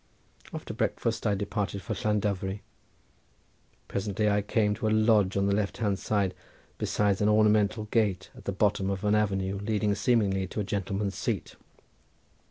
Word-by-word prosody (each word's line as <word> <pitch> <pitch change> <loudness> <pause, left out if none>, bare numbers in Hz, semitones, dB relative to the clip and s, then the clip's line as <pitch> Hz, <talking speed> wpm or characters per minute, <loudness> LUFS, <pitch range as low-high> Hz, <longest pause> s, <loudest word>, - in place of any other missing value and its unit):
After - - -6
breakfast 115 -1 -1
I 105 - +2
departed 100 0 -3
for 110 - -3
Llandovery. 100 -2 -1 1.3
Presently 105 +1 0
I 105 0 +2
came 105 0 +1
to 110 - -2
a - - +3
lodge 110 -3 +3
on 100 - +2
the 100 - +2
left 100 0 -1
hand 100 -4 0 0.8
beside 100 -2 +1
an 105 - +4
ornamental 105 0 +3
gate 105 -4 0
at - - -14
the - - -1
bottom 100 0 +1
of 100 0 -3
an 105 0 +2
avenue 100 -2 0
leading 105 0 0
seemingly 100 -5 +1
to 100 - -5
a - - +1
gentleman's 100 0 -2
seat. - - -3
105 Hz, 155 wpm, -28 LUFS, 100-105 Hz, 1.3 s, an